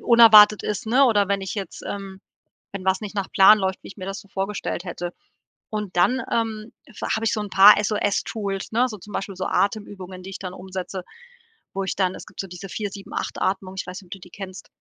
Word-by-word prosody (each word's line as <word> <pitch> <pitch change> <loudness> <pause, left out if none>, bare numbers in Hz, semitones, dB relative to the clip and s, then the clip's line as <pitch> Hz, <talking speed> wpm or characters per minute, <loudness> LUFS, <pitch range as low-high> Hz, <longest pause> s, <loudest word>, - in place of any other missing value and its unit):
unerwartet 215 -3 +8
ist, 210 +1 -3
ne, 255 +5 +5
oder 205 -6 +3
wenn 200 0 +1
ich 190 - -4
jetzt, 200 -3 -6
ähm 195 -1 -6 0.5
wenn 190 -2 -5
was 190 0 +2
nicht 210 -1 -6
nach 200 -2 -3
Plan 200 +2 +8
läuft, 190 -1 -2
wie - - -11
ich - - -12
mir 185 - -6
das 195 0 -4
so 200 - -19
vorgestellt 195 -2 -3
hätte, 175 -1 -5 0.6
und 210 -3 -4
dann, 235 +9 +3
ähm, 225 -1 -2
f 230 - -14
hab 220 - -4
ich 225 - +2
so 215 - -2
'n 205 -1 -5
paar 200 +2 +9
SOS-Tools, 205 -1 -2
ne, 245 +3 +3
so 215 - -7
zum 205 +3 -13
Beispiel 195 -1 -4
so 185 - -3
Atemübungen, 195 -3 -2
die 190 - -8
ich 195 - -7
dann 185 -1 -6
umsetze, 185 0 -6 0.7
wo 195 0 -2
ich 190 - -3
dann 185 -1 +1
es - - -9
gibt - - -9
so 195 - -4
diese 180 +2 -9
478 200 -1 -5
Atmung. 190 0 -1
Ich - - -3
weiß 185 +2 -7
nicht, - - -17
ob - - -28
du 195 - -7
die 180 - -14
kennst. 190 0 -9
195 Hz, 230 wpm, -23 LUFS, 190-210 Hz, 0.7 s, paar